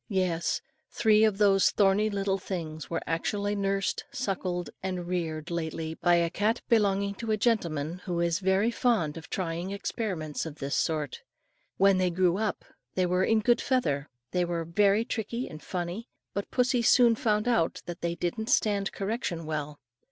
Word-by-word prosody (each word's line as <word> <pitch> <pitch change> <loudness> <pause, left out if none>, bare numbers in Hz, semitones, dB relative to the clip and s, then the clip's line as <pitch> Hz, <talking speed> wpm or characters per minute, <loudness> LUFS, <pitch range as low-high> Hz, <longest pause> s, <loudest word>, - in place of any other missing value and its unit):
Yes, 185 -4 0 0.3
three 215 -1 +4
of 215 -3 +3
those 195 -2 +5
thorny 205 +1 +3
little 195 -1 -1
things 160 -5 -5
were 170 - -2
actually 200 +5 -1
nursed, 195 -1 -1
suckled, 190 -9 -2
and 185 -2 -3
reared 165 -3 -3
lately 160 -1 -3
by 175 +1 +3
a 170 -1 +2
cat 220 +6 0
belonging 200 -4 +2
to 225 +3 -6
a 215 - +2
gentleman, 170 -8 0
who 175 -2 -2
is 170 0 +1
very 195 +4 +2
fond 225 - +1
of 165 -1 -9
trying 175 0 -3
experiments 195 -6 -3
of 160 -3 -6
this 140 -1 -4
sort. 155 -4 -1 0.6
When 195 -1 +5
they 185 -1 +2
grew 180 0 +2
up, 215 -2 -2 0.3
and 180 -1 +2
were 180 +1 +3
in 220 +2 +3
good 240 +2 +3
feather, 150 - 0 0.2
they 180 -1 +1
were 170 -1 -2
very 200 +5 +3
tricky 235 +3 -3
and 155 -1 -9
funny; 180 - -4 0.3
but 200 - -3
pussy 250 -1 +2
soon 235 0 +6
found 215 -1 0
out 200 -10 +1
that 175 0 -7
they 170 0 -1
didn't 220 +7 -3
stand 205 -6 +2
correction 195 -5 -3
well. 150 -1 -4
190 Hz, 170 wpm, -28 LUFS, 170-210 Hz, 0.6 s, soon